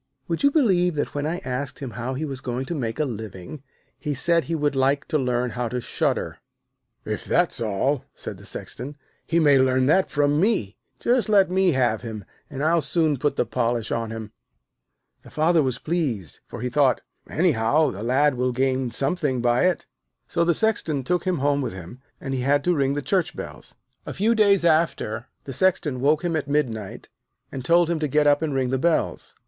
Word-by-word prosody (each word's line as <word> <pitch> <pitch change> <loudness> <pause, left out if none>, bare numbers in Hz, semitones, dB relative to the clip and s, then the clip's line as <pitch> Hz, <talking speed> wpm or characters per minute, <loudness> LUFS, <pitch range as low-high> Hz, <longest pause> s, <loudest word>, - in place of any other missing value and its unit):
'Would 165 - -2
you 280 - +5
believe 190 - +2
that 145 - -2
when 145 +1 -2
I 170 +3 -2
asked 130 +2 -3
him 135 -4 -6
how 120 +3 -4
he 155 +4 -3
was 135 -3 -5
going 125 +1 -3
to 170 - -4
make 115 -8 -3
his 155 - +1
living, 110 +1 -7 0.4
he 150 -2 -3
said 170 +4 +2
he 165 - -2
would 145 -2 0
like 135 +1 +1
to 155 -2 +1
learn 125 -1 0
how 125 -1 -2
to 125 - -2
shudder?' - - -2 0.7
'If - - -3
that's - - +1
all,' 115 +6 0
said - - -7
the - - -14
Sexton, 140 +4 -6 0.3
'he 170 - +2
may 145 -4 +5
learn 130 0 +3
that 185 +7 +3
from 145 +1 +2
me. 185 - +1 0.2
Just 240 -2 +1
let 195 -3 +4
me 190 -2 +3
have 120 -4 +1
him, 110 -4 -7 0.2
and 140 -1 -5
I'll 165 +1 +3
soon 155 0 +1
put 145 +3 0
the - - +1
polish 120 -1 -1
on 115 -1 -1
him.' 110 -1 -7 0.9
The - - -15
Father 160 +1 +3
was 130 -3 -1
pleased, 135 - -2
for - - -8
he 125 - -2
thought: 140 -1 +3 0.3
'Anyhow, 150 -3 +2
the 100 - -8
Lad 135 +5 +3
will 125 0 0
gain 130 0 0
something 135 +1 0
by 120 +5 +2
it.' 180 - -1 0.4
So 170 - 0
the 170 -1 +2
Sexton 170 -11 0
took 180 +7 0
him 185 -2 +1
home 145 +1 +1
with 130 - -3
him, 95 +8 -10 0.2
and 135 - -4
he 130 - -1
had 140 +2 +2
to 180 - +2
ring 140 -1 +1
the 145 - -3
church 185 0 0
bells. - - -9 0.3
A - - -5
few 215 +5 +2
days 200 -5 +4
after, 155 -9 +1 0.2
the 135 - -7
Sexton 150 -4 +1
woke 150 +4 +2
him 170 -2 0
at 150 -3 -2
midnight, 120 -9 -2 0.4
and 130 - -6
told 170 +5 +4
him 170 -1 -1
to 155 - 0
get 150 +2 +2
up 145 0 +4
and 160 -2 -1
ring 130 -2 0
the 130 - 0
bells. 170 +2 0
140 Hz, 210 wpm, -24 LUFS, 125-165 Hz, 0.9 s, you